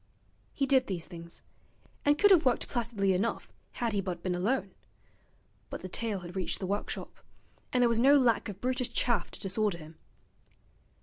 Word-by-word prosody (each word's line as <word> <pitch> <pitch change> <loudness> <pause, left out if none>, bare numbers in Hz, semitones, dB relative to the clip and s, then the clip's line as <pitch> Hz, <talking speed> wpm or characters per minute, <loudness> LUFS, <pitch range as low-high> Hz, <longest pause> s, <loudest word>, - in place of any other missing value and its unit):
He 275 - 0
did 265 -1 +3
these 180 -4 -3
things, 170 -1 -10 0.6
and 290 +1 +4
could 410 +4 +5
have 355 -5 +7
worked 255 -3 +1
placidly 220 -5 0
enough 200 +5 -2 0.2
had 235 -3 -1
he 200 - +1
but 180 -3 -5
been 185 - 0
alone; 195 +3 -1 1.0
but - - -6
the - - -5
tale 205 +1 -3
had 175 +1 -9
reached 185 -2 0
the 190 - -3
workshop, 200 +2 -4 0.5
and 250 -1 +3
there - - +6
was 230 -1 +2
no 275 +4 +7
lack 235 -5 +2
of 200 -1 -7
brutish 255 +1 -1
chaff 235 -3 +1
to - - -11
disorder 200 -1 0
him. 160 0 -13
210 Hz, 180 wpm, -30 LUFS, 185-250 Hz, 1.0 s, have